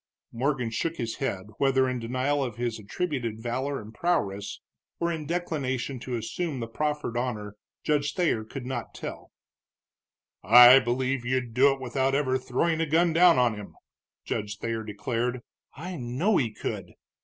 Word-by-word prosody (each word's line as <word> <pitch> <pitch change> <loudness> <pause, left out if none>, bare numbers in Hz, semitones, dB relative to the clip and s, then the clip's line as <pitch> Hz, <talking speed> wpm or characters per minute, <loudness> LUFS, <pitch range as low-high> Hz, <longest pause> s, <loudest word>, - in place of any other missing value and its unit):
Morgan 125 -1 -1
shook 165 +8 -1
his 115 -6 -4
head, 100 -9 -2 0.2
whether 135 -1 +3
in 130 -1 -2
denial 130 +5 0
of 120 -5 -4
his 120 -1 -2
attributed 120 - -3
valor 130 +4 -2
and 110 +1 -11
prowess, 105 - -1 0.4
or 170 0 0
in 155 -3 -4
declination 140 -7 -2
to 125 +1 -4
assume 135 +6 -3
the 115 - -3
proffered 150 +1 -2
honor, 110 -4 -3 0.3
Judge 145 -1 0
Thayer 165 -11 +1
could 125 +4 -8
not 125 -2 -5
tell. - - -7 1.1
"I 120 +5 +9
believe 125 +1 -1
you'd 125 -1 -1
do 135 +4 +5
it 135 - -3
without 130 +1 0
ever 130 -2 +1
throwing 160 +6 0
a 165 - 0
gun 165 +2 +3
down 170 0 +6
on 125 -2 +3
him," 105 -1 -9 0.5
Judge 105 -1 -3
Thayer 115 0 -3
declared. 120 +3 -2 0.3
"I 175 +6 -6
know 135 - +1
he 115 -5 +1
could!" - - -5
130 Hz, 160 wpm, -27 LUFS, 115-145 Hz, 1.1 s, I